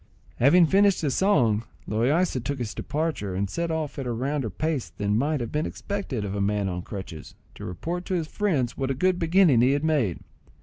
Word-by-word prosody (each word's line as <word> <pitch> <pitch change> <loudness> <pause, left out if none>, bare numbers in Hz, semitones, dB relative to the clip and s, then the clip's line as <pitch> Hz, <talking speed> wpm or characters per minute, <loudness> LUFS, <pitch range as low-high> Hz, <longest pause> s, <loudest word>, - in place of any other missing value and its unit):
Having 165 +8 +6
finished 195 +3 +3
his 145 -5 0
song, 120 - +3 0.2
Loaysa 130 - +1
took 140 +2 -2
his 120 -4 -4
departure, 145 - -3
and 100 +2 0
set 170 - -3
off 155 -3 -3
at 135 - -4
a - - -1
rounder 130 +1 -2
pace 140 - -2
than 100 +4 -1
might 145 +4 +1
have 115 - -4
been 150 +1 -1
expected 190 - -4
of 100 - -4
a 100 - -2
man 100 0 0
on 90 -1 -3
crutches, 90 -4 -8 0.2
to - - -9
report 170 - -4
to 185 - -1
his 165 -3 -1
friends 155 - -1
what 135 -1 -2
a 135 - 0
good 180 +5 +1
beginning 165 -7 +4
he 130 +3 +4
had 145 +1 0
made. 140 - +1
135 Hz, 210 wpm, -25 LUFS, 110-165 Hz, 0.2 s, Having